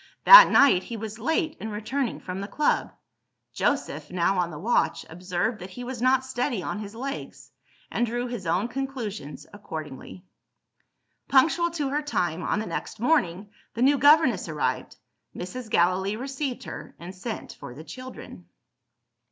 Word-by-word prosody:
That - - +11
night, 275 -10 +5
he 230 +4 -7
was 220 +1 -7
late 320 - -1
in 220 - -5
returning 230 +5 -3
from 185 +1 -6
the 200 - -5
club. 295 +6 0 0.6
Joseph - - -1
(now 180 +1 +1
on 175 -1 0
the 155 - -8
watch) 220 +10 0
observed 180 +6 -3
that 185 +1 -8
he 245 +7 -8
was 245 -1 -6
not 260 +1 +3
steady 245 -5 -2
on 210 - -4
his 210 0 -8
legs 275 +4 -7 0.4
and 240 - 0
drew 240 +1 -1
his 240 -7 -5
own 180 +7 +1
conclusions 235 - -5
accordingly. 160 -2 -8 1.0
Punctual 320 +6 +4
to 305 -5 -2
her 290 +2 0
time, 180 - -1
on 170 - -1
the 215 - -2
next 220 - -5
morning, 205 - +1 0.2
the 235 - 0
new 280 +1 +4
governess 285 - +5
arrived. 150 -2 -2 0.4
Mrs. 220 +6 -7
Gallilee 185 +3 +2
received 270 +2 -4
her, - - -9
and 175 +2 -9
sent 215 +5 -6
for 125 - -10
the 155 - -9
children. 255 - -10
225 Hz, 160 wpm, -26 LUFS, 185-265 Hz, 1.0 s, That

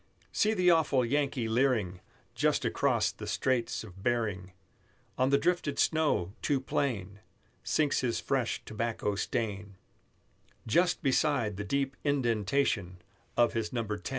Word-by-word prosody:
See 215 +1 +2
the 180 -2 +4
awful 150 -6 +3
Yankee 135 -2 0
leering 110 -6 +1 0.3
Just - - +1
across - - +1
the - - -9
Straits 125 -4 0
of 95 -3 -12
Behring; 105 -6 -1 0.6
On 130 +1 +2
the 140 - +4
drifted 155 -2 0
snow, 150 - +1
too 140 -2 +1
plain, 105 -7 -2 0.4
Sinks 150 -2 +1
his 120 -3 -1
fresh 130 -4 -1
tobacco 110 -1 -2
stain, 100 -2 -3 0.9
Just 175 +10 +2
beside 130 -6 +1
the 100 - -3
deep 135 +5 -1
inden 120 -7 +1
Tation 100 -7 0 0.4
of 120 -1 +4
his 115 -2 -2
Number 115 -4 -2
10. - - -6
120 Hz, 135 wpm, -30 LUFS, 105-140 Hz, 0.9 s, the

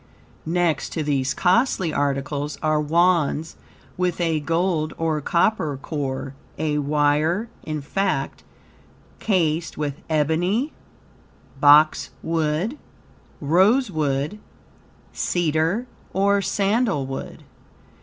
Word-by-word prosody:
Next 170 -3 0
to 160 - -2
these 135 -3 0
costly 185 - +2
articles 140 +1 -2
are 155 -1 +2
Wands 165 -1 +1 0.4
with 180 -1 -1
a 165 -3 +1
gold 165 0 -1
or 160 -2 -1
copper 165 -2 +1
core, 135 -2 -4 0.2
a 150 -1 0
wire, 150 +8 +1
in 155 -1 -4
fact, 195 +8 -2 0.8
cased 170 -5 0
with 145 -1 -3
ebony, 175 - +1 0.9
boxwood, 155 - +3 0.6
rosewood, 170 - +1 0.7
cedar 170 +6 0 0.3
or 200 +1 +2
sandalwood. 195 - -1
160 Hz, 85 wpm, -23 LUFS, 150-185 Hz, 0.9 s, boxwood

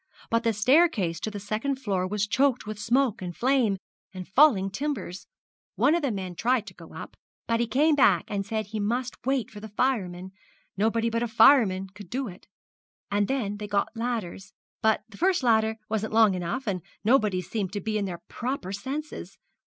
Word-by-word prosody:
But 230 +1 +2
the 230 - +2
staircase 215 - +3
to 215 - -3
the 205 -1 -6
second 215 +7 -2
floor 200 -8 -1
was 210 +1 -1
choked 260 +3 +1
with 215 -1 -6
smoke 235 +1 +1
and 175 -2 -6
flame, 245 -6 +2 0.3
and 185 -2 -8
falling 200 -5 +4
timbers; 220 -8 -4 0.5
one 255 - +3
of 340 - +1
the 280 - 0
men 190 -4 -4
tried 235 +5 +1
to 190 - -10
go 165 -2 -14
up, - - -8 0.3
but 230 0 0
he 235 - +1
came 295 +8 +3
back 200 - +4
and 200 -1 -2
said 215 +1 -3
he 215 +1 -5
must 240 +5 -2
wait 265 -5 0
for 210 - -9
the 220 +1 -9
firemen 190 -6 -1 0.4
nobody 225 +3 +1
but 230 0 0
a 240 - 0
fireman 220 -5 +5
could 195 -1 -13
do 260 +1 -2
it. 180 -3 -12 0.6
And 205 0 +1
then 220 -7 -2
they 210 0 -6
got 205 +2 -1
ladders, 225 -6 -4 0.3
but 220 -1 +2
the 220 - -14
first 360 -3 +2
ladder 220 -2 +3
wasn't 220 0 -2
long 220 -3 +5
enough, 180 +8 -3
and 190 -5 -2 0.2
nobody 215 -5 +3
seemed 190 +1 -3
to 205 - -2
be 215 +2 -2
in 200 - -1
their 175 -3 -6
proper 245 -6 -4
senses. 270 +9 -6
220 Hz, 195 wpm, -26 LUFS, 195-250 Hz, 0.6 s, fireman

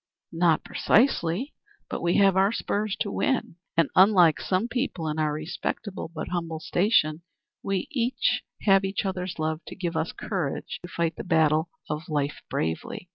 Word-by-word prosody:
"Not 165 -1 +3
precisely; 225 - +2 0.3
but - - -4
we 175 0 +1
have 195 -2 +5
our 195 +2 +4
spurs 210 -2 -1
to 205 - 0
win. 260 -10 -1 0.2
And, 165 -3 +3
unlike 185 -5 +6
some 190 +5 0
people 240 - -2
in 155 +1 -2
our 155 -1 +1
respectable, 160 +5 -4
but 165 - -5
humble 165 -3 -3
station, 160 -2 +2 0.4
we 195 -2 -2 0.8
have 195 -2 +5
each 195 +1 -2
other's 185 -1 -3
love 155 0 -1
to - - -7
give 175 -3 -3
us 165 - -1
courage 180 -10 -4
to 175 - -9
fight 170 -2 -1
the - - -5
battle 160 -2 +2 0.2
of 150 +3 -4
life 145 -2 -1
bravely. 80 - -3
175 Hz, 160 wpm, -26 LUFS, 160-195 Hz, 0.8 s, unlike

